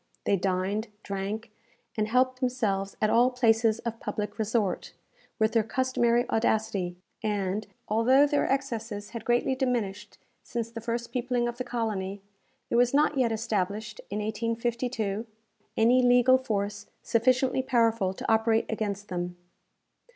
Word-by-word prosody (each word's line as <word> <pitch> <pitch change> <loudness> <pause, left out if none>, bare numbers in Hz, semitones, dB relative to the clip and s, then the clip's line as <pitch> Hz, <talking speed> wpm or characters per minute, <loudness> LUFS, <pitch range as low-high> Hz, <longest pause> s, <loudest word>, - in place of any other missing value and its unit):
They 200 - +2
dined, 190 +3 -1 0.2
drank, 205 +3 -4 0.4
and 215 -1 0
helped 255 +2 +2
themselves 215 -7 -1
at 215 - +3
all 240 +2 +5
places 225 -3 +3
of 230 -1 -4
public 210 +1 -4
resort, 215 -3 -1 0.4
with 220 -1 +2
their 230 - +3
customary 240 0 +1
audacity; 215 -5 0 0.3
and, 205 -1 -1 0.2
although 250 +6 +5
their 290 0 +1
excesses 230 -6 -3
had 230 - -6
greatly 240 +2 +2
diminished 240 -7 -2 0.2
since 230 -1 -4
the 230 -1 -7
first 235 +1 -3
peopling 245 -1 0
of 240 +1 -5
the - - -1
colony, 210 -5 -3 0.5
there 235 - +3
was 245 +2 +3
not 300 0 +3
yet 240 -3 +3
established, 215 -1 -2
in 200 - -3
1852, 230 0 -2 0.5
any 240 +3 +5
legal 245 +1 +5
force 205 -4 -3 0.2
sufficiently 255 +3 +2
powerful 230 -6 +2
to - - -6
operate 225 0 +3
against 205 -2 -3
them. 175 -1 -3
225 Hz, 135 wpm, -28 LUFS, 210-245 Hz, 0.5 s, all